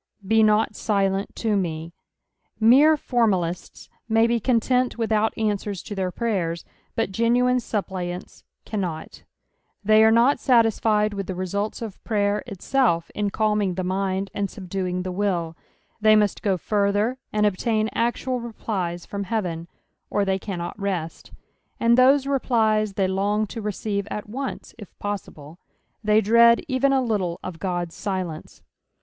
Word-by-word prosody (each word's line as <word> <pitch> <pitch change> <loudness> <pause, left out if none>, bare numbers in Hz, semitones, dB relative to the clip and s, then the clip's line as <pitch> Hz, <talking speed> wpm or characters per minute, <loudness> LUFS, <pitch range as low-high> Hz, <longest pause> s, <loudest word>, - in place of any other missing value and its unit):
'* 200 - -18
Be 220 +2 +4
not 215 0 +3
silent 195 -2 0
to 220 -2 0
me." 165 -3 -3 0.7
Mere 275 +8 +6
formalists 190 - -1 0.2
may 225 +1 +4
be 235 0 +1
con 235 +1 +2
hmt 250 +2 +1
withont 220 -1 +1
answera 210 -2 -1
to - - -6
their 190 -2 -1
prayers, 180 -6 -2 0.3
but - - -1
genuine 245 +4 +2
suppliants 185 -5 -5 0.2
cannot; 180 -7 -4 0.6
they 215 +1 +6
are 220 - +6
not 235 +5 +4
satitfled 220 -4 +3
with 195 -2 -4
the 185 - -4
results 200 +5 -3
of 215 -4 -8
prayer 205 -2 0
itself 195 -4 0
in 205 -1 -1
calming 210 -2 0
the 185 - -2
mind 190 +1 -2
and 200 -1 -2
subduing 185 -2 -4
the 185 - -4
will 180 -4 -1 0.2
— - - -41
they 215 0 +6
muat 210 -1 +2
go 195 -3 +1
further 205 +6 0
and 210 0 +1
obtain 215 +2 +1
actual 245 +2 -1
replies 195 -7 -4
from 200 -1 -5
heaven, 175 -6 -3 0.4
or 205 - +1
th«y 190 0 0
cannot 180 -1 -5
rest; 185 -5 -4 0.5
and 235 0 +4
those 265 +2 +5
replies 220 -6 +1
they 195 -1 +1
long 200 +3 0
to 225 +2 -7
recrive 205 -1 -3
at 210 - -5
once, 265 +5 -6
if 205 - -12
possible; 175 -6 -6 0.4
they 215 +1 +4
dread 235 +2 +6
even 270 0 +2
a 265 -1 +2
little 195 -7 -1
of 175 -3 -7
God's 175 -3 -3
silence. 185 -6 -5
205 Hz, 150 wpm, -23 LUFS, 185-225 Hz, 0.7 s, Mere